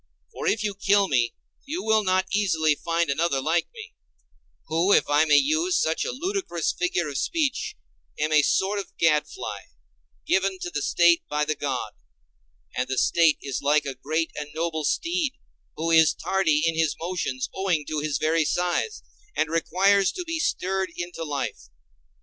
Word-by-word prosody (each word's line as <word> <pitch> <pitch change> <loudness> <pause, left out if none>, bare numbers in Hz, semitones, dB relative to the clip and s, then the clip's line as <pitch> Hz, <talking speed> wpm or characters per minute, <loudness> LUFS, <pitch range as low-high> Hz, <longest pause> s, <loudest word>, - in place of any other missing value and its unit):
For - - -5
if 215 - +1
you 210 -1 -1
kill 200 0 +2
me 120 -6 +1 0.3
you 315 +6 -4
will 220 -1 +3
not 185 -1 +2
easily 165 -7 +2
find 165 0 -1
another 145 -1 0
like 160 +5 0
me, 455 -1 -11 0.7
who, 165 +5 +1
if - - +4
I 145 +2 +4
may 150 -2 +5
use 325 - +2
such 160 +1 0
a - - -2
ludicrous 345 - -2
figure 180 -2 -1
of 140 -2 -3
speech, 310 -6 -1 0.4
am 150 +1 -1
a 155 -1 +6
sort 195 +7 +1
of 195 - -9
gadfly, 155 -2 0 0.7
given 190 0 +1
to 175 - -4
the 145 - -2
State 170 +1 +4
by 150 0 0
the 155 - 0
God; 145 -2 -3 0.8
and 125 +1 -1
the 130 0 -3
State 165 +2 +4
is 135 -3 -3
like 145 +1 +2
a 140 - -3
great 155 +5 -2
and 150 -1 -5
noble 160 -1 -2
steed 335 - 0 0.4
who 165 +1 -2
is 160 -2 +5
tardy 160 -6 +1
in 165 - 0
his 160 -2 +1
motions 165 -7 -3
owing 185 -6 0
to 155 +1 -2
his 150 -1 -1
very 160 +1 +2
size, 180 - -1 0.3
and 155 - 0
requires 190 +4 +3
to 360 - -4
be 330 -1 -3
stirred 190 -8 -1
into 175 -1 -5
life. 145 -3 -4
170 Hz, 175 wpm, -25 LUFS, 150-195 Hz, 0.8 s, a